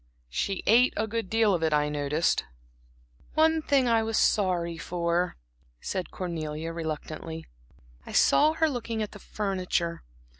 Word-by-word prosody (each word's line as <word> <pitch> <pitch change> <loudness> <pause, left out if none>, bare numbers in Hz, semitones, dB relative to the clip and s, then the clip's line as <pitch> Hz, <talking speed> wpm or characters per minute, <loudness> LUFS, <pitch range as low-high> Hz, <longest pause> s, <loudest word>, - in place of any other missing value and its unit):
"She 195 - -2
ate 240 +4 +5
a 215 - +1
good 220 -3 -3
deal 220 -2 +3
of 175 - 0
it, 160 -1 +1
I 150 0 +3
noticed." 150 +2 0 0.9
"One 320 0 +4
thing 275 -4 +2
I 230 -1 +4
was 220 0 -1
sorry 175 -4 +2
for," 170 +2 -1 0.4
said 185 - -3
Cornelia, 165 -2 -4
reluctantly. 160 0 -5 0.6
"I - - -10
saw 305 +2 +5
her 320 0 +2
looking 230 -5 -2
at 210 - -6
the 205 - -11
furniture. 185 -5 -2
185 Hz, 145 wpm, -27 LUFS, 165-225 Hz, 0.9 s, ate